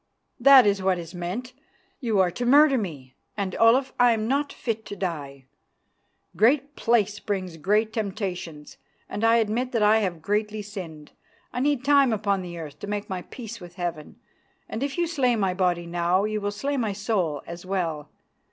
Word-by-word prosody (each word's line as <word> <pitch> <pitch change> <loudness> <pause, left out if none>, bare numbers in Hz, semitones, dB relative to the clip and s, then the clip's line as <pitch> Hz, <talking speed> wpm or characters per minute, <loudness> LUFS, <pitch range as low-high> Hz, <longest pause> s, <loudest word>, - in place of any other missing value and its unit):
"That 270 0 +8
is 200 -1 +2
what 190 -1 +2
is 170 0 -8
meant. 185 +9 -5 0.5
You 225 -5 0
are 180 -1 +2
to 245 - -4
murder 280 +3 +6
me, 145 - -6 0.2
and, 195 -3 -2
Olaf, 255 +4 +4
I'm 230 -3 +3
not 280 +3 0
fit 225 -2 -4
to 205 - -6
die. 145 -8 -5 0.9
Great 270 - +2
place 215 -3 +1
brings 185 -5 -3
great 210 +7 +1
temptations, 185 -7 -5 0.3
and 205 - -5
I 225 0 +5
admit 235 +3 0
that 225 -3 +2
I 215 +1 +5
have 175 -6 -3
greatly 210 +1 -1
sinned; 165 -7 -9 0.4
I - - -2
need 275 -1 0
time 280 -3 +5
upon 200 -3 0
the 175 -1 -7
earth 155 -4 -8
to - - -7
make 205 -1 -4
my 185 -1 -3
peace 230 +3 -9
with 175 0 -11
Heaven, 175 +2 -5 0.5
and 220 - -5
if 280 +2 -2
you 345 - +2
slay 275 -7 +1
my 195 -4 0
body 180 -2 0
now, 175 +2 +1
you 215 0 -2
will 205 - -1
slay 275 +8 -2
my 220 -5 -1
soul 190 - -1
as 170 +1 -8
well. 170 -6 -3
205 Hz, 180 wpm, -25 LUFS, 175-235 Hz, 0.9 s, That